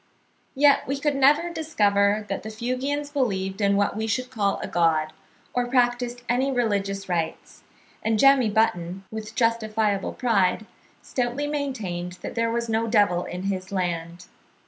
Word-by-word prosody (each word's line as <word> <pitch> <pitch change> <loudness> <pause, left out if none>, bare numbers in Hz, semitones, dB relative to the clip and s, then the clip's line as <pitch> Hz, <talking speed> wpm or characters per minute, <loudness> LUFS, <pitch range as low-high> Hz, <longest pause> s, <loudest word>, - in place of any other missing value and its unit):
Yet 285 +1 +4
we 275 +1 -2
could 295 0 +1
never 295 +5 +4
discover 210 -10 +1
that 195 - -3
the 220 - -7
Fuegians 255 +6 -3
believed 195 -7 -1
in 200 0 +3
what 200 0 +1
we 220 +1 -2
should 255 +3 -2
call 200 -4 0
a - - -5
God, 160 -2 +1 0.4
or 245 0 0
practised 245 -1 0
any 255 +3 +1
religious 200 -5 -1
rites; 170 -3 -3 0.4
and 220 0 +1
Jemmy 270 -1 +5
Button, 190 -4 0
with 220 -1 -7
justifiable 220 -3 0
pride, 215 -4 +1 0.4
stoutly 250 +3 -2
maintained 220 -12 -3
that - - -5
there 230 0 0
was 235 0 -1
no 225 0 0
devil 205 -6 +2
in 180 +1 -6
his 190 -1 -3
land. 175 -2 -3
220 Hz, 150 wpm, -25 LUFS, 195-250 Hz, 0.4 s, Jemmy